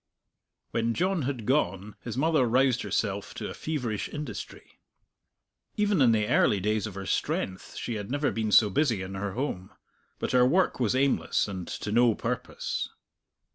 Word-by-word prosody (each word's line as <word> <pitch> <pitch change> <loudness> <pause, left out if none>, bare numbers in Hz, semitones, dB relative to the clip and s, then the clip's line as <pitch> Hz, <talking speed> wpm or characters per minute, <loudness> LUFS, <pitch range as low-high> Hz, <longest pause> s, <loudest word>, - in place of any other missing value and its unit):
When 115 0 0
John 185 0 +1
had 125 -6 -5
gone 105 -6 0
his 115 0 -6
mother 155 -3 +3
roused 125 +1 +3
herself 100 0 -2
to - - -5
a - - -6
feverish 125 -9 -3
industry. 150 0 -7 1.0
Even 205 -6 +2
in 120 -3 +6
the 105 -2 +2
early 105 -4 +3
days 105 +2 0
of 100 - -9
her 100 0 -5
strength 95 0 -2
she 120 - -4
had 105 -1 -5
never 145 +2 0
been 110 -1 -2
so 105 -1 +6
busy 115 -4 +1
in 95 +1 -7
her 95 0 -3
home. 100 -7 -3 0.5
But - - -2
her 125 -1 +5
work 175 +7 +2
was 120 -1 +1
aimless 130 -13 +2
and 95 -4 -5
to 105 - -4
no 120 0 +4
purpose. - - -3
115 Hz, 170 wpm, -28 LUFS, 100-135 Hz, 1.0 s, in